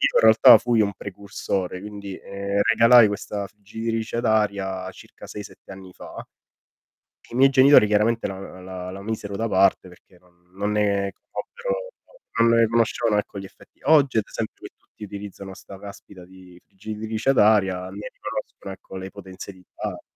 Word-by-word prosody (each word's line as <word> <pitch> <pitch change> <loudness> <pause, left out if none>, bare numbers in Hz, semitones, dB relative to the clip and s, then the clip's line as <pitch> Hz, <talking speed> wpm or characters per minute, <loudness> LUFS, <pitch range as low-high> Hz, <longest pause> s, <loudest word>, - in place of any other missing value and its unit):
in - - +6
realtà - - +8
fui 120 -2 +1
un 100 - +1
precursore, 95 -2 -4
quindi, 100 -1 -8
ehm, 100 +1 -3
regalai 115 +1 +6
questa 100 0 -4
friggitrice 110 +3 -5
ad 120 - -2
aria 100 -4 0
circa - - -14
6-7 105 -1 -10
anni 95 -1 -11
fa, - - -12 1.2
i 120 - -10
miei 135 +1 +6
genitori 135 -3 +7
chiaramente 105 +3 +1
la 95 -1 -8
la 90 0 -7
la 95 +1 -8
misero 105 -1 -5
da 115 +2 -2
parte 95 -1 +2
perché 90 0 -19
non 90 0 -30
non 105 +1 -1
ne 100 -2 0
conobbero - - -6 0.5
non 115 - +5
ne 115 - +5
conoscevano 115 -1 +1
ecco 105 - -4
gli 95 - -7
effetti. 95 - -17
Oggi 145 -5 +4
ad 105 - +1
esempio - - -5
qui - - -9
tutti 105 - -14
utilizzano 100 -1 -8
'sta 95 - -12
caspita 100 -2 -12
di 90 -1 -16
friggitrice 110 +4 -3
ad 135 - +2
aria, 95 -4 +3
ne 100 +2 -7
riconoscono 95 - -7
ecco, 95 - -13
le 95 +1 -7
potenzialità. 95 0 -9
100 Hz, 160 wpm, -23 LUFS, 95-110 Hz, 1.2 s, realtà